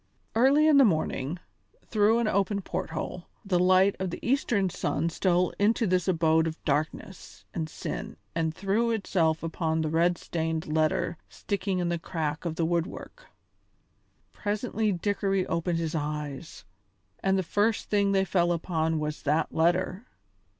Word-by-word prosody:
Early 275 +7 +5
in 305 -2 +6
the 275 - +8
morning, 155 - 0 0.5
through 215 +1 +3
an 235 -2 +1
open 200 0 0
port - - -4
hole, 165 +2 -5 0.2
the 185 -3 +1
light 185 +2 +4
of 190 -1 -2
the 175 - -5
eastern 225 -8 +1
sun 165 +1 -1
stole 180 +1 +1
into 225 +3 +3
this 185 -2 +1
abode 160 -2 +3
of 160 0 -4
darkness 155 +5 -3
and 160 -2 -3
sin - - -6 0.2
and 160 -1 0
threw 200 +7 0
itself 175 -8 0
upon 160 -1 -1
the 155 -1 -1
red 170 +2 +2
stained 160 -1 -3
letter 155 +2 0
sticking 200 -2 -2
in 175 -1 0
the 170 -1 -1
crack 160 -1 -3
of 165 -2 -2
the 165 - 0
woodwork. 175 - -3 1.0
Presently 215 0 -1
Dickory 195 0 0
opened 170 +1 -1
his 165 -2 -2
eyes, 150 - -5 0.6
and 195 0 +2
the 190 - 0
first 205 +5 0
thing 200 -1 +3
they 195 -1 +2
fell 175 -2 +2
upon 160 -1 0
was 150 0 -3
that 150 +3 0
letter. 185 +6 +1
175 Hz, 155 wpm, -27 LUFS, 160-200 Hz, 1.0 s, the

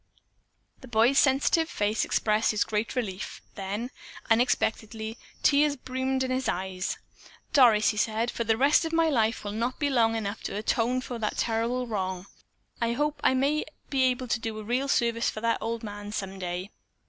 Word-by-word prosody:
The 260 - -12
boy's 240 +3 +4
sensitive 285 +4 +3
face 210 -4 0
expressed 215 0 +1
his 215 - +2
great 215 +3 -2
relief, 205 -6 -4
then, 205 +6 -4 0.4
unexpectedly, 225 -2 +1 0.3
tears 290 0 +4
brimmed 260 0 -2
his 260 0 -1
eyes. 185 +1 -2 0.6
"Doris," 230 -7 +6
he 210 - -2
said, 220 +2 0
"the 225 -2 0
rest 280 +6 +4
of 325 0 -3
my 325 0 +3
life 225 -5 +1
will 205 - -4
not 235 +4 -2
be 290 -2 0
long 225 -3 +3
enough 215 -1 -3
to - - -3
atone 235 +4 +1
for 245 -2 -6
that 215 -1 -2
terrible 235 +2 0
wrong. 190 -5 -3 0.6
I 230 0 +1
hope 295 +4 -1
I 260 - +4
may 285 +4 +1 0.3
be 270 -2 +2
able 255 0 0
to 240 - +1
do 225 -1 -4
a 215 - -6
real 250 +5 0
service 235 -3 +1
for - - -5
that 230 0 +1
old 230 0 -3
man 205 -1 -7
some 195 -2 -4
day." 180 +2 -4
230 Hz, 175 wpm, -27 LUFS, 215-260 Hz, 0.6 s, Doris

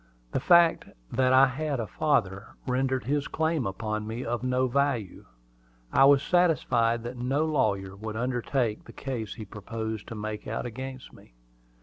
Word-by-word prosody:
The - - 0
fact 170 -1 +5 0.3
that 130 +1 +2
I 130 +1 +7
had 140 +1 -2
a 115 - -1
father, 110 -7 -1
rendered 130 0 0
his 145 +2 -1
claim 160 -6 0
upon 105 +2 -3
me 115 +3 -4
of 120 +1 -2
no 130 0 +1
value. 130 -6 -1 0.7
I 135 - +6
was 140 0 +6
satisfied 125 -10 +2
that 120 +1 -6
no 135 +5 0
lawyer 100 -11 0
would 110 +2 -6
undertake 120 -1 -1
the 115 - -12
case 120 -6 -5
he 110 - -7
proposed 110 +1 -5
to 115 - -7
make 105 0 -5
out 110 - -3
against 130 +2 -7
me. - - -18
125 Hz, 160 wpm, -27 LUFS, 110-135 Hz, 0.7 s, I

